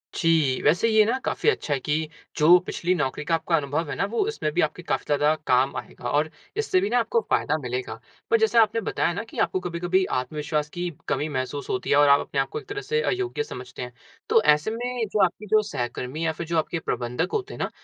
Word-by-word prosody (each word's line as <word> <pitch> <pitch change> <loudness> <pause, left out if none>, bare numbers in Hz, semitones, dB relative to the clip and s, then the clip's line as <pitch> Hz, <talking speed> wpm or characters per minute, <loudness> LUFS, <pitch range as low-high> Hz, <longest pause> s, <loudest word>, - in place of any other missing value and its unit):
जी, 160 -6 +2
वैसे 170 +9 +3
ये 220 -1 +6
ना, 245 +4 +1
काफी 450 - +1
अच्छा 150 - -1
है 135 - 0
कि 155 +3 -1 0.3
जो 165 +4 +7
पिछली 180 +2 0
नौकरी 145 -2 -2
का 165 -1 +2
आपका 165 +1 0
अनुभव 150 +1 -1
है - - -3
ना, - - 0
वो 235 - 0
इसमें 435 - -2
भी 175 - +2
आपके 155 +3 -1
काफ़ी - - -1
ज़्यादा 150 +1 +3
काम 130 +2 +3
आएगा 120 - -6
और 150 +3 +1 0.3
इससे 395 -4 +2
भी 400 - 0
ना - - +3
आपको 470 - +1
फ़ायदा - - +1
मिलेगा। 125 -4 -4 0.3
पर 230 - +6
जैसे 220 +2 +2
आपने 225 0 +4
बताया 175 - 0
ना 200 - -3
कि - - -12
आपको 185 - +1
कभी-कभी 180 +1 0
आत्मविश्वास 150 +3 -2
की 175 +2 -3 0.2
कमी 150 - 0
महसूस 135 0 -4
होती 125 - -2
है - - +4
और 145 - +6
आप 140 0 +7
अपने 140 - -3
आपको 135 - -4
एक 415 - -16
तरह 410 0 -4
से 460 +1 0
अयोग्य 385 +1 -1
समझते - - -9
हैं, - - -6 0.4
तो 455 0 +5
ऐसे 150 +8 +3
में 245 0 -2
जो 205 -2 +4
आपकी 185 +4 -5
जो 215 0 +6
सहकर्मी 125 +5 -3
या 160 - +2
फिर 165 +1 -6
जो 170 - 0
आपके 165 +1 -1
प्रबंधक 120 -4 -2
होते 420 -3 -2
हैं - - -9
ना, - - -1
165 Hz, 235 wpm, -25 LUFS, 145-220 Hz, 0.4 s, जो